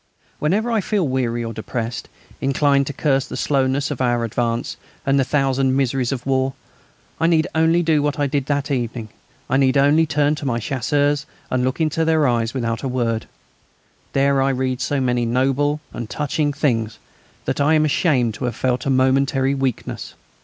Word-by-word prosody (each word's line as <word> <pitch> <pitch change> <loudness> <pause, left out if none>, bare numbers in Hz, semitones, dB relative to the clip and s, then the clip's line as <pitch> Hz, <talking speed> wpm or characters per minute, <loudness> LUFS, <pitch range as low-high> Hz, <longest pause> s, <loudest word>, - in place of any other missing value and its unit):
Whenever 210 +10 +1
I 225 -2 +2
feel 195 -5 0
weary 120 -3 -1
or 115 0 -4
depressed, 115 +1 -4 0.3
inclined 140 0 +2
to - - -2
curse 135 -1 +1
the - - -6
slowness 135 0 0
of 135 - -4
our 120 -2 +1
advance 115 +1 -2 0.3
and 135 0 +3
the - - +4
thousand 135 -1 +1
miseries 130 -2 0
of 130 -3 -4
war, 135 0 +1 0.7
I 165 - +3
need 160 -2 +3
only 160 +2 +3
do 160 -3 +2
what 145 0 -1
I 145 - +1
did 140 -1 -1
that 145 0 -1
evening. 120 -3 -2 0.4
I 135 - +1
need 135 0 +3
only 145 +4 +4
turn 150 0 +2
to 145 - -6
my 120 -2 0
Chasseurs 140 +4 0 0.2
and 130 -1 +1
look 130 +3 -1
into 160 0 +1
their 160 -2 +3
eyes 115 -2 +1
without 115 -3 -2
a 135 - -2
word; 120 -3 -1 0.9
there 140 0 +3
I 135 - +2
read 130 -1 -1
so 145 +2 0
many 125 -2 +1
noble 135 +5 +1
and 120 -2 -6
touching 150 0 -1
things 115 -6 -1 0.5
that - - -1
I 155 +3 +4
am 155 0 +3
ashamed 135 -7 +2
to 125 - -4
have 120 - -2
felt 125 0 -1
a - - +2
momentary 135 +1 +2
weakness. 135 -3 -3
135 Hz, 185 wpm, -21 LUFS, 125-145 Hz, 0.9 s, the